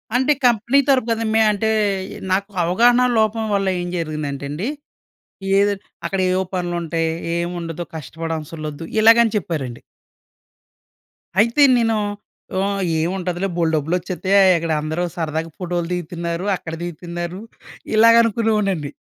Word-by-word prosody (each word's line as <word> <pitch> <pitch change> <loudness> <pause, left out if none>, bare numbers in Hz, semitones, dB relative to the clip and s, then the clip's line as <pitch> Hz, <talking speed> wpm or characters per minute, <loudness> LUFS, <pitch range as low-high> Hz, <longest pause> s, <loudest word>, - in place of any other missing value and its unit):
అంటే 265 +4 +3
కంపెనీ 235 +3 +3
తరపు 255 -3 +3
కదా! 225 0 0
మే 220 - +4
అంటే, 210 +2 -1 0.6
నాకు 200 +2 0
అవగాహన 240 +8 +4 0.2
లోపం 220 +1 +1
వల్ల 195 -1 +1
ఏం 175 - -4
జరిగిందంటే 150 -4 -4
అండి, 180 - -3 0.9
"ఏదోటి 200 0 +1 0.2
అక్కడేవో 185 -1 +1
పనులుంటాయి. 170 -2 -1 0.3
ఏం 170 0 -1
ఉండదు, 165 +1 -5
కష్టపడవసర్లొద్దు, 160 0 -6 0.2
ఇలాగని 230 0 +6
చెప్పారండి." 145 - -4 1.6
అయితే 235 +7 +4
నేను 225 -1 +2 0.7
ఆహ్, 200 -1 -2 0.2
ఏముంటదిలే 180 +2 -2
బోల్డు 165 -2 +1
డబ్బులొచ్చేత్తయి. 180 +5 -1
అయ్ 185 - +6
అక్కడ 165 -1 -3
అందరూ 160 +3 -2
సరదాగా 160 0 -3
ఫోటో‌లు 175 -2 -2
దిగుతున్నారు. 170 +1 -3
అక్కడ 165 -2 -7
దిగుతున్నారు. 175 +2 -6 0.5
ఇలాగ 230 +1 +7
అనుకునేవాడ్నండి. 210 -9 0
180 Hz, 115 wpm, -20 LUFS, 165-215 Hz, 1.6 s, ఇలాగ